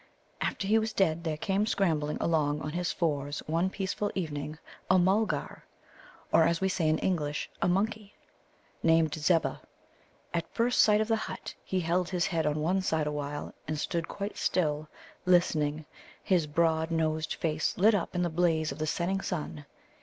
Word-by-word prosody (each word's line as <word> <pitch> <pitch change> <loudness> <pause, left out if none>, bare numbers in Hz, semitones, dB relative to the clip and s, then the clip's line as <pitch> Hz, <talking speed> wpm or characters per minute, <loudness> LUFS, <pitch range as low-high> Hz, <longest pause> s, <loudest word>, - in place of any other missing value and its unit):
After - - -1
he 220 +3 +4
was 220 0 -2
dead, 165 -4 +1
there 160 -2 -2
came 200 +5 0
scrambling 155 -8 +1
along 150 -3 +1
on 150 - -4
his 175 +1 -1
fours 145 -3 -1
one 165 +4 +1
peaceful 195 +2 -2
evening 150 -4 -3 0.3
a 185 - +6
Mulgar 200 +4 +1 0.7
(or, 165 - +7
as 170 0 +2
we 190 - +1
say 170 -4 +1
in 155 - +3
English, 150 -6 -1
a - - +3
monkey) 210 +3 -1 0.7
named 165 -2 +3
Zebbah. 160 +2 +1 0.7
At 170 -1 -2
first 245 +1 +3
sight 210 0 +5
of 220 - 0
the 225 - +3
hut - - -6
he 190 - -1
held 175 +1 0
his 180 -2 0
head 160 -3 0
on 150 - +1
one 185 +5 +1
side 160 -4 0
awhile, 145 -1 -4
and 155 - -2
stood 165 +2 -2
quite 200 +1 -5
still, 155 -3 0 0.4
listening, 155 -4 +2 0.4
his 175 -5 +2
broad 160 +1 +1
nosed 160 -1 0
face 160 -1 -1
lit 215 +5 +5
up 195 -2 -1
in 180 - +1
the 175 - +1
blaze 160 -2 +1
of - - -8
the 155 - -1
setting 185 +5 0
sun. 150 -5 -4
165 Hz, 175 wpm, -29 LUFS, 155-190 Hz, 0.7 s, or